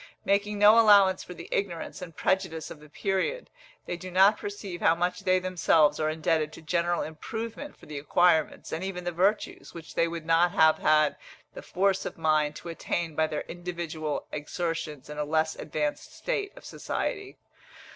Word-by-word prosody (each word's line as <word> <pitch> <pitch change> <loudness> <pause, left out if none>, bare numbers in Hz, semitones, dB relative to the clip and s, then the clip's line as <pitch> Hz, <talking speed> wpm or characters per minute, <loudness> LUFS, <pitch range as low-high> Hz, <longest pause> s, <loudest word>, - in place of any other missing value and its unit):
Making 205 +1 +1
no 210 +2 +7
allowance 200 -4 +6
for 180 - -10
the 170 - -9
ignorance 180 -4 -3
and 170 -3 -8
prejudices 185 -5 -1
of 155 - -9
the 150 0 -16
period, 195 - -2 0.3
they 175 - -4
do 185 +1 -8
not 195 +4 +5
perceive 200 -3 -6
how 165 - +4
much 180 +1 -1
they 185 -2 +2
themselves 165 -5 +2
are 155 0 +1
indebted 155 -1 0
to - - -11
general 170 +2 0
improvement 225 - -6
for - - -16
the 150 -1 -6
acquirements, 160 +1 +2
and 160 +3 -3
even 185 -2 -4
the 175 - -2
virtues, 190 +4 -1
which 165 -1 -10
they 170 - +2
would 165 -1 -6
not 165 +2 +3
have 160 0 +5
had 155 -1 +3 0.4
the - - -8
force 195 +1 0
of - - -6
mind 155 -2 +1
to 170 - -8
attain 165 0 -3
by 155 +1 +1
their 150 -1 -3
individual 170 -3 -5
exertions 150 -2 -4
in 150 0 -7
a - - +1
less 155 +1 0
advanced 150 -1 -3
state 405 -5 -2
of - - -13
society. 400 -1 -4
170 Hz, 180 wpm, -27 LUFS, 155-190 Hz, 0.4 s, no